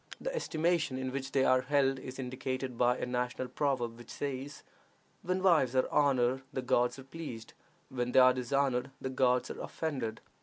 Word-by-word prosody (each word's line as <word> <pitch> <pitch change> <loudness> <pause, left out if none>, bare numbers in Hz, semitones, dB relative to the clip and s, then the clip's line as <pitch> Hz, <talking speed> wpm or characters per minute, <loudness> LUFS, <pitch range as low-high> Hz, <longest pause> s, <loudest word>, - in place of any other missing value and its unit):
The - - -3
estimation 165 - 0
in 130 0 -3
which 135 0 -4
they 135 -1 +3
are 130 0 +4
held 135 -1 +2
is 130 0 -8
indicated 130 0 -4
by 125 +1 +3
a - - -2
national 125 0 -2
proverb, 120 -5 -1
which 120 - -13
says, 140 0 -5 0.6
"When 185 +1 -1
wives 155 -9 +4
are 130 - +3
honored 130 -3 +3
the 130 - -3
gods 125 0 +2
are 135 - -9
pleased; 135 -6 -8 0.4
when 125 -1 -2
they 130 - +6
are 130 0 +7
dishonored 130 0 0
the 130 - -4
gods 125 -1 +2
are - - -7
offended." 130 -9 -3
130 Hz, 180 wpm, -32 LUFS, 125-140 Hz, 0.6 s, are